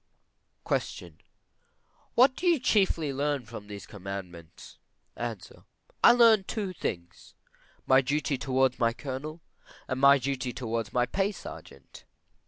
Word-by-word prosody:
Q. - - +2 1.3
What 260 +2 +5
do 360 - -2
you 340 -2 +5
chiefly 190 - +1
learn 140 -1 -1
by 115 0 -8
these 105 -1 -10
commandments? 95 -4 -9 0.4
A. 120 -2 -4 0.7
I - - +9
learn 230 -4 +6
two 200 -4 -4
things: 85 - -6 0.5
my 130 0 +5
duty 145 +1 -1
towards 130 -1 0
my 115 -1 +2
Colonel, 145 +5 -6 0.5
and 130 -1 -3
my 140 +1 +7
duty 130 -1 -3
towards 115 -3 -3
my 125 0 +2
pay 195 +8 -1
sergeant. 70 - -12
130 Hz, 125 wpm, -28 LUFS, 115-165 Hz, 1.3 s, I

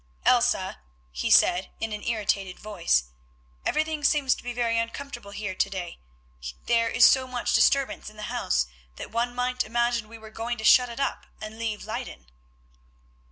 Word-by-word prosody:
"Elsa," - - +2 0.3
he 65 - -2
said, 180 +2 +5
in 225 -1 -3
an 210 - -5
irritated 200 -5 -1
voice, 180 - +1 0.6
"everything 310 -1 -1
seems 285 -3 +3
to - - -9
be 245 - -5
very 235 -1 0
uncomfortable 240 -1 -5
here 200 -1 -5
to 195 - 0
day, 180 -3 -6 0.7
there 230 -1 +2
is - - +6
so 260 -1 +3
much 250 -1 -2
disturbance 275 -5 +2
in 215 - -18
the 210 - -7
house 150 - +1 0.3
that - - -8
one 240 +2 -1
might 250 0 0
imagine 235 0 0
we 230 - -10
were 220 -1 -13
going 235 +2 -4
to 220 - -7
shut 250 +2 +6
it 235 - -8
up 275 - -2
and 215 +1 -8
leave 220 -3 -3
Leyden." 225 - -6
230 Hz, 170 wpm, -26 LUFS, 210-245 Hz, 0.7 s, is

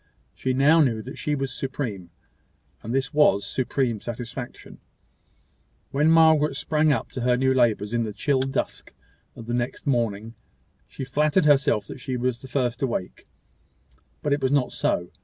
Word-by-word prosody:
She 130 - -2
now 145 +5 +5
knew 115 -6 +1
that 130 - -9
she 150 - -1
was 135 -2 -3
supreme; 120 -10 -4 0.7
and 115 - -6
this 135 +3 -1
was 145 -10 +4
supreme 125 -4 -1
satisfaction. 120 +1 -7 1.1
When 150 +3 +2
Margaret 160 -3 +5
sprang 155 +1 +1
up 140 - -1
to 130 - -5
her 125 0 +2
new 130 +1 +2
labours 115 -4 +1
in 120 - +1
the 110 - -4
chill 135 +6 0
dusk 135 0 -3 0.4
of 115 - -10
the 120 - -4
next 120 +1 -3
morning, 115 -5 -1 0.5
she - - -7
flattered 150 +6 +2
herself 140 -7 +3
that - - -8
she 130 -2 -3
was 125 -1 -2
the 130 - -10
first 125 -1 -1
awake; 115 -9 -3 1.0
but 145 - +1
it 145 - -1
was 130 0 +1
not 140 -3 +2
so. 85 0 -1
130 Hz, 165 wpm, -24 LUFS, 120-145 Hz, 1.1 s, now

